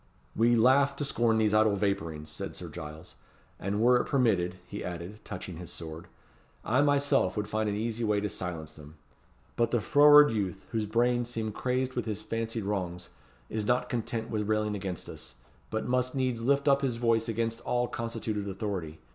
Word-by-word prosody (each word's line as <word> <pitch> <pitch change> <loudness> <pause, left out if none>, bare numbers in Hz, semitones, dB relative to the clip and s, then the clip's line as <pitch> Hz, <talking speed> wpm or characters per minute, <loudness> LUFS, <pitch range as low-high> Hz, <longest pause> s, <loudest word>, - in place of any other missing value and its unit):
"We 120 +1 +4
laugh 130 +4 +4
to 145 - -2
scorn 115 -4 +2
these 110 -1 +2
idle 110 -1 +4
vapourings," 95 -7 -2
said 75 - -6
Sir - - -7
Giles; 75 +3 -9 0.5
"and 100 +2 -2
were 125 +2 +5
it - - -6
permitted," 100 -10 +2
he - - -6
added, 90 +4 -6
touching 90 -2 -7
his 85 -1 -7
sword, 80 +1 -7 0.6
"I 125 +5 +3
myself 145 -3 +2
would 105 0 -1
find 110 0 -1
an 100 - -1
easy 115 +2 -2
way 105 -2 +2
to 105 - -1
silence 85 -5 -5
them. 75 0 -13 0.6
But 115 -1 +2
the 120 - +1
froward 145 +5 +7
youth, 100 -3 -3
whose 110 -2 -1
brains 120 +2 +1
seem 110 -2 -3
crazed 130 +3 -1
with 120 - -2
his 105 -2 -3
fancied 115 -1 -3
wrongs, 90 -3 -3 0.4
is 105 - -3
not 125 0 +1
content 115 -1 -3
with 105 -2 -2
railing 105 -1 +1
against 95 -3 -5
us, - - -9 0.3
but 110 +2 -2
must 125 +1 0
needs 130 -3 0
lift 140 +4 +2
up 140 -1 +5
his 130 -4 0
voice 115 -1 +1
against 115 0 -1
all 125 0 0
constituted 115 -3 -3
authority. 95 -5 -4
110 Hz, 185 wpm, -29 LUFS, 100-120 Hz, 0.6 s, froward